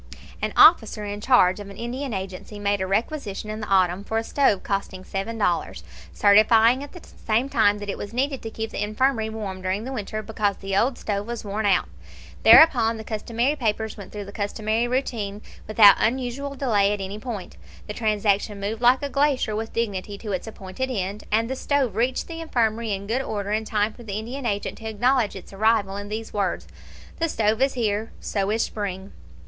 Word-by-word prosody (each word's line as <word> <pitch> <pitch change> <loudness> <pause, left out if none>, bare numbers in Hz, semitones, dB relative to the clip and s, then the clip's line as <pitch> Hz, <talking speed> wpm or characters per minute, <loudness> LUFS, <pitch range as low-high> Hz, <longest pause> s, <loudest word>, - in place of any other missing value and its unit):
An - - -1
officer 220 -9 +6
in 205 0 -5
charge 210 -7 +4
of 205 -1 -8
an 200 - -11
Indian 255 +3 -4
agency 190 +1 -6
made 205 -1 0
a 190 - -1
requisition 215 0 -2
in 215 - -5
the 210 - -5
autumn 185 0 +2
for 220 +2 -2
a 225 - 0
stove 225 -6 +1
costing 195 -2 -3
seven 195 +4 -4
dollars, 175 - -1 0.3
certifying 220 - +5
at 285 - -9
the 355 - -12 0.2
same 230 +4 +2
time 210 -5 +3
that 205 0 -7
it 200 - -4
was 205 - -6
needed 270 +3 -1
to 225 - -5
keep 220 0 -5
the - - -4
infirmary 220 +2 0
warm 205 -4 -5
during 190 +3 -2
the 265 +3 -5
winter, 215 -2 -4
because 205 -2 -1
the 195 0 -4
old 240 +5 +2
stove 205 0 -3
was 235 -2 -5
worn 205 +1 -1
out. 190 -2 +3 0.5
Thereupon 235 -8 +7
the 220 - -7
customary 230 +5 -1
papers 220 -4 -2
went 200 -2 -10
through 205 -1 -6
the 200 - -9
customary 215 +2 -1
routine, 220 -5 -2 0.2
without 215 -2 +7
unusual 260 +4 -1
delay 210 -7 +2
at 205 - -4
any 195 +2 -5
point. 215 -5 -7 0.3
The 210 - -6
transaction 210 -2 0
moved 215 +3 -3
like 250 +3 +4
a - - 0
glacier 275 -6 +1
with 220 +1 -4
dignity 205 -3 -3
to 210 0 -6
its 185 +3 -3
appointed 220 +4 -5
end, 200 -3 -3
and 225 +2 +2
the 265 - -3
stove 265 -6 0
reached 245 +3 0
the 330 -1 -7
infirmary 230 -7 0
in 200 0 -3
good 235 +6 0
order 205 -5 -4
in 220 +1 0
time 210 0 0
for - - -14
the 210 -3 -5
Indian 240 +4 -4
agent 205 -2 -3
to 220 -1 -5
acknowledge 240 +1 +1
its 190 +1 -11
arrival 205 -1 +2
in 205 0 -6
these 220 +1 -5
words: 195 -3 -1 0.5
"The 330 0 +1
stove 220 -2 +1
is 270 0 +2
here. 220 -2 -1
So 200 -1 -2
is 220 +2 +1
spring." 195 -2 -5
215 Hz, 205 wpm, -24 LUFS, 200-240 Hz, 0.5 s, Thereupon